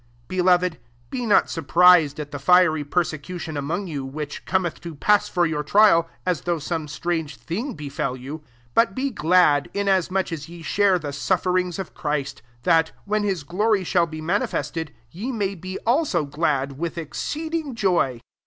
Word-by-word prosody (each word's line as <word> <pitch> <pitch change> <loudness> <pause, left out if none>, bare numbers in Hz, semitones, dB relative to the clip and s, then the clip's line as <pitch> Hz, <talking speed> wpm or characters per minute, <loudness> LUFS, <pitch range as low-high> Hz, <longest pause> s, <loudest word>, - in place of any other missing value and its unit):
Its 120 0 -33
Beloved, 180 -3 +2 0.3
be 250 -3 -3
not 210 - +5
surpris 170 0 +5
ed - - -13
at 145 -1 -6
the 145 - -5
fiery 160 0 +4
persecution 160 +1 -3
among 160 +8 -2
you, 150 -6 -4
which 145 +2 -6
cometh 185 -3 -1
to 170 -2 -7
pass 210 +8 +3
for 175 -1 +2
your 155 -2 -1
trial, 170 0 +4 0.2
as 180 -3 0
though 175 -1 0
S<»aae 160 0 -4
strange 160 -2 -3
thing 225 - -4
befel 140 -3 -3
you: 135 +5 -7
IS - - -21 0.3
but 230 -4 +3
be 275 +1 -1
glad, 160 - +3
inasmuch 190 -2 +1
as 160 -1 -6
ye 170 -1 -10
^«Mre 195 +4 +2
the 145 -3 -5
sufferings 180 +3 0
of 190 -2 -6
Christ; 150 -2 -3 0.2
tSoLt, 165 0 +4 0.2
when 210 +1 0
his 195 -6 -1
glory 200 +5 +1
shall 175 -1 +2
be 155 -1 -7
manifested, 160 -3 -2 0.2
ye 215 - -4
may 205 -5 -1
be 185 +1 -6
also 235 - +2
glad 140 -2 -1
with 170 0 -3
exceeding 305 - -4
joy. 170 - +1
170 Hz, 170 wpm, -23 LUFS, 150-190 Hz, 0.3 s, not